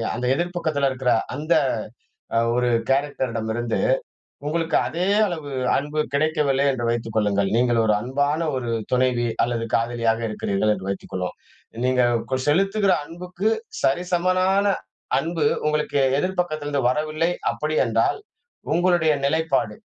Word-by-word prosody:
அந்த 125 - -3
எதிர் 175 +4 -2
பக்கத்தில 150 -5 +1
இருக்கிற 130 -1 0 0.2
அந்த 155 +3 0 0.8
அ - - +5 0.2
ஒரு 125 0 +1 0.2
கேரக்டர் 135 -2 0
இடமிருந்து, 115 +1 -2 0.7
உங்களுக்கு 165 +1 0
அதே 175 +3 -2 0.2
அளவு 160 -6 -5 0.3
அன்பு 150 +2 -1
கிடைக்கவில்லை 145 -2 +2
என்று 120 -2 -3
வைத்துக் 115 -1 -3
கொள்ளுங்கள். 100 -2 +2
நீங்க 120 0 +3
ஒரு 105 - +3
அன்பான 140 +6 0 0.2
ஒரு 120 -2 -3 0.2
துணைவி, 125 -1 +2 0.2
அல்லது 115 -1 -2
காதலியாக 115 -1 +1
இருக்கிறீர்கள் 105 0 0
என்று 95 -1 -7
வைத்துக் 100 - -6
கொள்வோம், 90 -1 -3 0.5
நீங்க 130 0 +3 0.3
கொ 130 - +2
செலுத்துகிற 195 +5 +3
அன்புக்கு, 180 +5 -3 0.3
சரிசமனான 185 +5 +2 0.6
அன்பு 165 0 -1 0.2
உங்களுக்கு 150 -2 0 0.2
எதிர் 185 +2 -2
பக்கத்தில 155 -4 -3
இருந்து 140 -4 0
வரவில்லை 155 +4 0 0.2
அப்பிடி 155 +1 -2
என்றால், 115 - +1 0.6
உங்களுடைய 175 -2 +3
நிலைப்பாடு, 160 +3 0
145 Hz, 130 wpm, -23 LUFS, 120-165 Hz, 0.8 s, அ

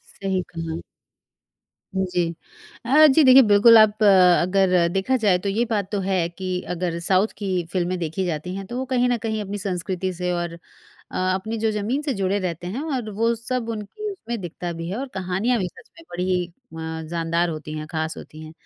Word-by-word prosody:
सही 190 -2 -1
कहा। 165 0 -4 1.2
हुँ, 190 0 +1
जी। 175 -2 0 0.5
अ, 300 +5 +6
जी 295 +2 +5
देखिए 260 0 +9
बिल्कुल 225 +3 +8
आप 215 0 +5
अ, 185 -3 +6
अगर 180 -1 +3
देखा 195 +7 +1
जाए 200 -6 +3
तो 200 - 0
ये 220 +4 +1
बात 205 -4 -2
तो 205 - 0
है 185 -3 0
कि 185 +2 -6 0.2
अगर 175 -1 -2
साउथ 185 +4 +3
की 185 -4 -2
फिल्में 185 0 -1
देखी 170 +3 -2
जाती 175 +2 -3
हैं, 195 0 -5
तो 245 - -5
वो 260 - -2
कहीं 250 -1 +1
न 240 - +2
कहीं 220 -1 -3
अपनी 205 0 -4
संस्कृति 185 -1 -3
से 180 +1 -2
और 175 -1 -2 0.6
अ, - - -4 0.2
अपनी 220 +4 -3
जो 220 0 +1
ज़मीन 215 +7 -1
से 285 -3 -1
जुड़े 195 0 0
रहते 175 -2 -4
हैं 235 +10 -4
और 240 -4 -3
वो 230 +1 +3
सब 230 0 -3
उनकी 230 - -5
उसमें 235 - -6
दिखता 175 0 -5
भी 165 - -4
है 195 - -3
और 275 - -4
कहानियाँ 190 +6 0
भी 185 - -1
सच - - -15
में - - -14
बड़ी 180 0 -1
अ, 160 -6 -8
जानदार 170 0 0
होती 155 -1 -6
हैं, 155 - -5
खास 160 -1 -3
होती 155 +1 -11
हैं। 155 - -10
190 Hz, 205 wpm, -23 LUFS, 175-220 Hz, 1.2 s, देखिए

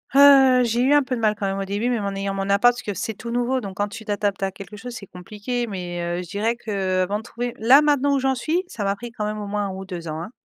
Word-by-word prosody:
Heu, 270 -3 +7
j'ai 235 +1 0
eu 265 +3 +4
un 290 -1 +5
peu 260 -1 -2
de 235 - -5
mal 215 -1 +2
quand 205 - -4
même 195 0 -1
au 195 - -2
début, 205 +4 -2
même 235 -4 -1
en 200 0 -3
ayant 195 0 -2
mon 195 0 -3
appart, 205 +5 +5
parce 245 - -8
que 205 -4 -4
c'est 220 +4 -3
tout 235 +3 -8
nouveau 245 +2 0
donc 195 -3 -8
quand 205 - 0
tu 220 +1 -9
t'adaptes 205 -2 -1
à 195 - +1
quelque 195 +1 -10
chose, 240 +3 -8
c'est 200 - -8
compliqué 210 +7 -5
mais 180 -4 -5
heu, 175 +1 -2
je 175 - -13
dirais 215 +4 0
qu'avant 195 -3 -1
de - - -11
trouver 240 +1 -4
là, 260 +7 +6
maintenant, 285 -1 +3
où - - +2
j'en 265 0 +1
suis 320 +8 -1
ça 220 - -5
m'a 195 0 0
pris 235 +3 -9
quand 215 -2 -4
même 210 0 -3
au 210 - -5
moins 205 0 -1
1 - - -5
ou 190 +1 -7
2 175 -3 -7
ans, 155 0 -4
hein. 175 - -7
210 Hz, 310 wpm, -23 LUFS, 195-245 Hz, -, Heu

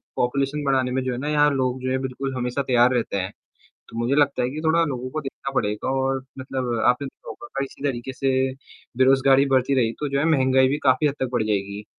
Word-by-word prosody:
Population 135 +4 -1
बढ़ाने 130 -2 +1
में 130 +1 0
जो 130 - -2
है 120 - -3
ना 135 +4 -4
यहाँ 150 -1 +4
लोग 130 -2 -1
जो 130 - -2
हैं 130 - 0
बिल्कुल 135 +1 -4
हमेशा 125 +2 -2
तैयार 125 0 +4
रहते 120 -5 -1
हैं। 95 0 -3 0.6
तो - - -11
मुझे 120 +4 +1
लगता 145 -3 +2
है 125 - +1
कि 150 +3 -5
थोड़ा 165 +1 +3
लोगों 130 -4 -4
को 155 - -3
देखना 135 -1 -6
पड़ेगा 105 -2 -1
और 135 0 -1
मतलब 130 -3 -3
आपने 125 +3 +2
देखा 135 - -13
होगा, - - -8 0.2
इसी 135 - -12
तरीके 130 -2 -2
से 135 +1 -2 0.7
बेरोज़गारी 135 +1 +4
बढ़ती 130 +1 +2
रही 115 -4 +2
तो 150 - -1
जो 140 0 -1
है 140 - +1
महँगाई 130 -3 +4
भी 145 +2 0
काफ़ी 130 +3 +4
हद 140 - +1
तक 130 - 0
बढ़ 120 - +1
जाएगी। 100 0 -2
130 Hz, 230 wpm, -23 LUFS, 125-140 Hz, 0.7 s, यहाँ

